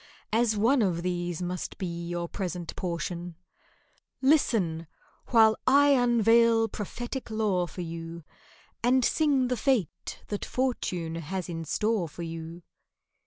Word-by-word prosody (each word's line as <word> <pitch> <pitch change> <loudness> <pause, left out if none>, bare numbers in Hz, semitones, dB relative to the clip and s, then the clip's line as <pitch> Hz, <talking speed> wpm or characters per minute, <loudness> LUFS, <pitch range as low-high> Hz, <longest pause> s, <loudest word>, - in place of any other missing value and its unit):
(As 225 -1 +2
one 240 +5 +3
of 175 -5 0
these 175 -1 -2
must 180 +1 -4
be 190 - -3 0.2
your 175 0 -3
present 175 -3 -5
portion) 175 -1 -4 0.8
Listen, 210 - +2 0.4
while 220 -2 +5
I 285 +2 +6
unveil 230 -3 +4
prophetic 240 +6 -5
lore 210 -5 0
for 180 - -7
you, 165 0 -6 0.6
And 250 +1 +3
sing 285 -5 +2
the 250 - 0
fate 225 - -1
that 205 - -3
Fortune 185 -10 -2
has 180 +3 -4
in 165 -1 -4
store 210 +1 0
for 170 - -8
you. 165 +1 -7
190 Hz, 125 wpm, -28 LUFS, 170-235 Hz, 0.8 s, I